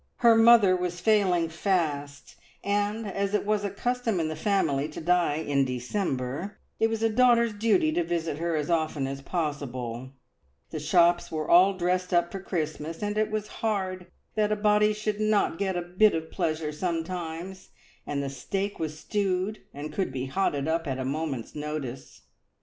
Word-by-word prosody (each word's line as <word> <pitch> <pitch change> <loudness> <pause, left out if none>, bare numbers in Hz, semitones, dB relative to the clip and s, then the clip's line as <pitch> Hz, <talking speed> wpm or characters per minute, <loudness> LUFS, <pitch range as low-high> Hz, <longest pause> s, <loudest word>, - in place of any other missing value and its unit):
Her 230 - +9
mother 225 -4 +7
was 180 -1 -3
failing 185 -5 +3
fast, 155 -5 -2 0.3
and 205 +2 0
as 200 0 -1
it 210 - 0
was 210 0 +1
a 200 - -1
custom 230 0 -1
in 160 -1 0
the 155 - -4
family 155 -6 0
to 150 - -8
die 175 -2 +2
in 145 -3 +1
December, 130 +5 -3 0.2
it 225 - +3
was 225 0 -2
a - - +5
daughter's 235 -1 +4
duty 230 - +2
to 345 +2 +1
visit 165 - -2
her 170 0 -1
as 150 +2 -1
often 155 -4 0
as 135 0 -5
possible; 130 -6 -4 0.6
the 155 - -4
shops 175 +2 +3
were 155 -1 -3
all 185 +3 +6
dressed 180 0 0
up 175 0 +2
for 195 - -5
Christmas, 160 -1 -4
and 205 0 -1
it 215 0 +1
was 215 -1 -3
hard 190 -4 -2 0.3
that 215 -1 +1
a - - +3
body 210 0 +3
should 210 0 -3
not 215 -5 +1
get 190 -2 0
a 175 - -2
bit 185 +4 +3
of 160 0 -4
pleasure 155 -1 -1
sometimes, 170 +2 -4 0.4
and 140 -1 -2
the - - -3
steak 195 +10 -3
was 155 -1 -4
stewed, 195 +2 -1
and 145 +2 -7
could 190 - -1
be 130 0 -3
"hotted 145 -1 -1
up" 165 0 0
at 135 -2 -2
a 130 - -3
moment's 140 -3 -3
notice. 150 -4 -6
175 Hz, 180 wpm, -27 LUFS, 155-205 Hz, 0.6 s, Her